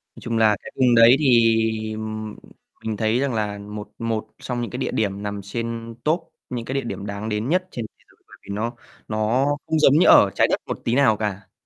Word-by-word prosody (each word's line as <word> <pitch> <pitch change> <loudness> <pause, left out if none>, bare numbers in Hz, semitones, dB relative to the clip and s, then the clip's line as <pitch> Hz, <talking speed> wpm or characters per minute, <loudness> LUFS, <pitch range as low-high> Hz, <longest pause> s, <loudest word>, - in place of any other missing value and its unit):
Nói - - -13
chung 115 -1 -2
là 110 -2 +4
cái - - -9
vùng 125 -2 +4
đấy 115 +2 +8
thì 115 -4 +2 0.9
mình 110 -1 -3
thấy 110 +2 +1
rằng 140 -1 0
là 105 -2 -2
một 105 +1 -8
một 110 -1 -2
xong 125 -1 -4
những 120 - -3
cái 125 - -5
địa 130 - -2
điểm 100 -2 -1
nằm 100 -1 -4
trên 115 +2 -5
top 165 +1 -1 0.2
những 120 -2 -4
cái 130 - -4
địa 135 - +1
điểm 110 -4 -5
đáng 100 +1 -5
đến 105 +3 -2
nhất 185 +3 +1
trên 120 - -5
thế - - -34
giới - - -28
bởi - - -16
vì 100 - -7
nó 115 +3 -2 0.3
nó 110 +5 +1 0.2
không 160 0 +1
giống 140 - +6
như - - +5
ở - - +7
Trái - - +4
Đất - - 0
một - - -4
tí 115 - +1
nào 125 -6 +4
cả. 105 -2 -4
115 Hz, 230 wpm, -22 LUFS, 105-125 Hz, 0.9 s, đấy